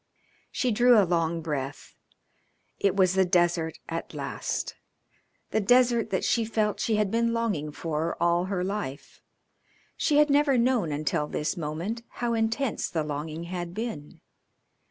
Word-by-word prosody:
She 250 Hz, -, 0 dB
drew 240 Hz, +2 st, +5 dB
a 200 Hz, -, +4 dB
long 170 Hz, -1 st, 0 dB
breath. 145 Hz, -3 st, -4 dB, 0.9 s
It 200 Hz, -1 st, +2 dB
was 185 Hz, -2 st, +4 dB
the 190 Hz, 0 st, +4 dB
desert 175 Hz, -2 st, +1 dB
at 165 Hz, 0 st, -5 dB
last, -, -, -3 dB, 0.8 s
the -, -, +2 dB
desert 240 Hz, +2 st, +3 dB
that 190 Hz, -, -1 dB
she 230 Hz, -, +2 dB
felt 215 Hz, -1 st, 0 dB
she 225 Hz, -, +1 dB
had 210 Hz, -2 st, +1 dB
been 230 Hz, 0 st, +1 dB
longing 205 Hz, -11 st, -1 dB
for 160 Hz, +1 st, -3 dB
all 170 Hz, +1 st, +2 dB
her 190 Hz, -2 st, -2 dB
life. 185 Hz, -8 st, -5 dB, 0.7 s
She 295 Hz, -, +2 dB
had 300 Hz, -1 st, +5 dB
never 285 Hz, -2 st, +4 dB
known 235 Hz, -8 st, +2 dB
until 150 Hz, 0 st, -1 dB
this 150 Hz, +4 st, -2 dB
moment 170 Hz, +8 st, -4 dB
how 240 Hz, -1 st, -1 dB
intense 225 Hz, +2 st, 0 dB
the 160 Hz, -3 st, -1 dB
longing 155 Hz, +2 st, -4 dB
had 175 Hz, 0 st, -5 dB
been. 215 Hz, -10 st, -6 dB
190 Hz, 150 wpm, -27 LUFS, 160-230 Hz, 0.9 s, drew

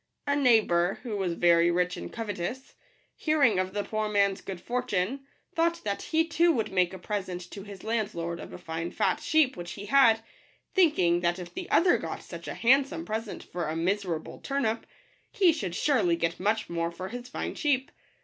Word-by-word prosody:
A 285 Hz, -1 st, +1 dB
neighbour, 215 Hz, -10 st, +3 dB
who 230 Hz, -5 st, -4 dB
was 190 Hz, -4 st, -1 dB
very 170 Hz, 0 st, +4 dB
rich 180 Hz, +1 st, +1 dB
and -, -, -7 dB
covetous, 225 Hz, +3 st, -5 dB, 0.4 s
hearing 280 Hz, -, +3 dB
of 185 Hz, 0 st, -1 dB
the 205 Hz, +1 st, -2 dB
poor 215 Hz, 0 st, -2 dB
man's 200 Hz, -2 st, +2 dB
good 190 Hz, -2 st, -6 dB
fortune, 245 Hz, +3 st, -2 dB, 0.3 s
thought 335 Hz, +1 st, +1 dB
that 200 Hz, -1 st, -2 dB
he 320 Hz, 0 st, +1 dB
too 335 Hz, +2 st, +3 dB
would 225 Hz, -10 st, -1 dB
make 180 Hz, -2 st, +2 dB
a 190 Hz, -, -7 dB
present 185 Hz, -1 st, -4 dB
to 200 Hz, -, -7 dB
his 200 Hz, -1 st, -10 dB
landlord 205 Hz, -7 st, -2 dB
of -, -, -9 dB
a -, -, -7 dB
fine 165 Hz, +1 st, -4 dB
fat 295 Hz, -, 0 dB
sheep 310 Hz, -3 st, +2 dB
which 175 Hz, 0 st, -6 dB
he 205 Hz, -, -8 dB
had, 230 Hz, -3 st, +5 dB, 0.5 s
thinking 290 Hz, -, +4 dB
that 175 Hz, 0 st, 0 dB
if 180 Hz, -2 st, -8 dB
the 365 Hz, -1 st, -6 dB
other 355 Hz, +1 st, +4 dB
got -, -, -5 dB
such -, -, -9 dB
a -, -, -4 dB
handsome 275 Hz, +6 st, +3 dB
present 220 Hz, -1 st, -4 dB
for 175 Hz, -2 st, -4 dB
a 155 Hz, -, -2 dB
miserable 175 Hz, -1 st, -2 dB
turnip, 265 Hz, -5 st, -1 dB, 0.4 s
he 375 Hz, -7 st, +4 dB
should 190 Hz, -, -4 dB
surely 220 Hz, -, +2 dB
get 165 Hz, 0 st, -1 dB
much 210 Hz, +3 st, 0 dB
more 170 Hz, 0 st, -1 dB
for 185 Hz, +2 st, -7 dB
his 245 Hz, +3 st, -7 dB
fine -, -, -4 dB
sheep. 270 Hz, -4 st, 0 dB
210 Hz, 190 wpm, -28 LUFS, 180-270 Hz, 0.5 s, had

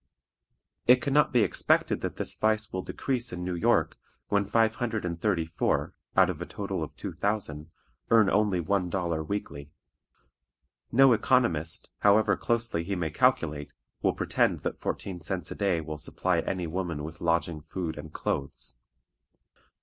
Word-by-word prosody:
It 125 Hz, +1 st, +7 dB
can 140 Hz, -1 st, -2 dB
not 150 Hz, +1 st, +4 dB
be 120 Hz, -3 st, +4 dB
expected 95 Hz, -, +2 dB
that -, -, -3 dB
this -, -, -1 dB
vice 110 Hz, -1 st, 0 dB
will 95 Hz, -, -1 dB
decrease 125 Hz, +3 st, -2 dB
in 90 Hz, 0 st, -5 dB
New 90 Hz, 0 st, -2 dB
York 85 Hz, -, +1 dB, 0.3 s
when 100 Hz, 0 st, +2 dB
five 110 Hz, +2 st, +2 dB
hundred 115 Hz, -5 st, -2 dB
and 85 Hz, -1 st, -4 dB
thirty 95 Hz, -6 st, +1 dB
four, 80 Hz, -1 st, -1 dB, 0.2 s
out -, -, +7 dB
of -, -, -9 dB
a -, -, -3 dB
total -, -, -4 dB
of -, -, -8 dB
two -, -, -6 dB
thousand, 85 Hz, -7 st, -2 dB, 0.4 s
earn 110 Hz, -3 st, +6 dB
only 100 Hz, -2 st, +2 dB
one 90 Hz, +1 st, 0 dB
dollar 85 Hz, -3 st, -1 dB
weekly. 75 Hz, -6 st, -5 dB, 1.2 s
No 135 Hz, +1 st, +6 dB
economist, 105 Hz, -, +1 dB
however 105 Hz, 0 st, +4 dB
closely 115 Hz, -8 st, -1 dB
he 100 Hz, +3 st, -2 dB
may 80 Hz, -4 st, -2 dB
calculate, 75 Hz, -1 st, +1 dB, 0.3 s
will -, -, +2 dB
pretend -, -, +1 dB
that -, -, -4 dB
fourteen 95 Hz, -3 st, -4 dB
cents 90 Hz, +2 st, -3 dB
a -, -, -4 dB
day 95 Hz, -5 st, +1 dB
will 75 Hz, -1 st, -6 dB
supply -, -, 0 dB
any 90 Hz, -2 st, -2 dB
woman 85 Hz, -3 st, -3 dB
with 80 Hz, +2 st, -8 dB
lodging, 85 Hz, -1 st, 0 dB
food, 85 Hz, +1 st, -4 dB
and 75 Hz, +1 st, -9 dB
clothes. 70 Hz, -6 st, -4 dB
90 Hz, 165 wpm, -28 LUFS, 80-110 Hz, 1.2 s, It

